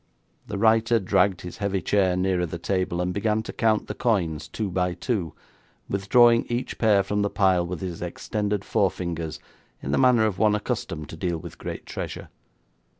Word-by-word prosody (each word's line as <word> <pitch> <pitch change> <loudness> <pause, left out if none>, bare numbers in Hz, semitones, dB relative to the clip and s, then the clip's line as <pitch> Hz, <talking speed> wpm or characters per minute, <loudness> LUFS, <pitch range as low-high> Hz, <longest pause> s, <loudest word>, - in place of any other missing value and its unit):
The - - -4
writer 115 +2 +4
dragged 95 -1 +2
his 90 - -8
heavy 100 -2 -1
chair 95 0 +2
nearer 90 -1 +1
the 85 - -5
table, 90 0 -1
and 90 0 -1
began 105 +2 0
to - - -7
count 110 -2 +1
the - - -5
coins 85 - 0
two 105 +1 -4
by 90 0 0
two, 100 - -2 0.5
withdrawing 115 +4 +4
each 120 +1 -3
pair 105 -3 +4
from 105 +2 -1
the 100 - +1
pile 95 -4 +2
with 85 -2 -5
his 90 -3 -5
extended 105 +3 -2
forefingers 85 -6 -1 0.4
in 70 - -4
the - - +2
manner 125 -4 +5
of 105 -4 -1
one 105 -1 +4
accustomed 105 - -3
to 80 - -8
deal 85 0 -1
with - - -10
great - - -6
treasure. - - -6
100 Hz, 180 wpm, -25 LUFS, 90-110 Hz, 0.5 s, manner